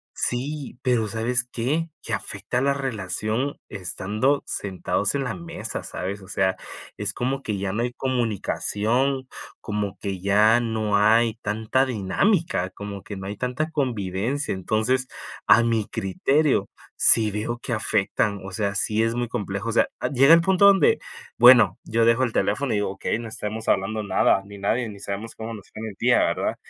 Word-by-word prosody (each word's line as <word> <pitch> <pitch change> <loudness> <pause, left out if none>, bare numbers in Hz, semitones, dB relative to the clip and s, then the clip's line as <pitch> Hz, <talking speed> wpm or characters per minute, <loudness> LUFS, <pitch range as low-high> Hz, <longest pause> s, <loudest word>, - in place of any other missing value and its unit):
Sí, 135 +1 0
pero, 120 -4 +1
¿sabes 115 +4 0
qué?, 150 +8 -1
que - - -5
afecta 125 - -2
la 140 +1 +2
relación 115 0 -3
estando 105 +9 -1
sentados 95 +1 -1
en 140 -1 -1
la - - -3
mesa, 165 -10 -6
¿sabes?, 100 +3 -5
o 95 - -14
sea, 95 0 0 0.4
es - - -1
como 135 +2 -2
que 105 -2 -3
ya 95 0 -3
no 110 +4 -1
hay 120 - -2
comunicación, 125 +1 -1 0.3
como 105 -1 -3
que 100 -2 -4
ya 105 +4 +4
no 110 -3 0
hay 110 +2 +3
tanta 110 +5 0
dinámica, 125 - 0
como 100 0 -8
que 100 - -7
no 95 0 -7
hay 100 - -5
tanta 125 +7 -2
convivencia. 125 - -2
Entonces, 110 +7 0 0.4
a - - +6
mi 115 -3 0
criterio, 115 - 0 0.3
sí 110 -2 +7
veo 110 +3 -4
que 120 - -3
afectan. 105 -1 0
O 95 - -7
sea, 100 +1 -1
sí 105 +2 +2
es 115 0 0
muy 120 0 -2
complejo, 105 -2 -4
o - - 0
sea, - - +3
ad - - -2
llega 135 +4 +6
el 170 - +7
punto 190 +3 +3
donde, 200 -1 +5 0.4
bueno, 120 -7 +7
yo 115 0 +1
dejo 115 +2 +3
el 120 - 0
teléfono 120 +7 0
y - - +1
digo, 105 - -1
okey, 100 +3 -3
no 115 - -7
estamos 110 0 -5
hablando 110 +3 0
nada, 100 -1 +2
ni 100 0 -11
nadie 115 +5 -1
ni 100 -1 -11
sabemos 100 +3 -6
cómo 110 +1 -6
nos 105 -4 -11
fue 110 - -9
en 110 - -4
el 100 - -11
día, 125 +1 +4
¿verdad? - - 0
110 Hz, 180 wpm, -23 LUFS, 100-125 Hz, 0.4 s, sí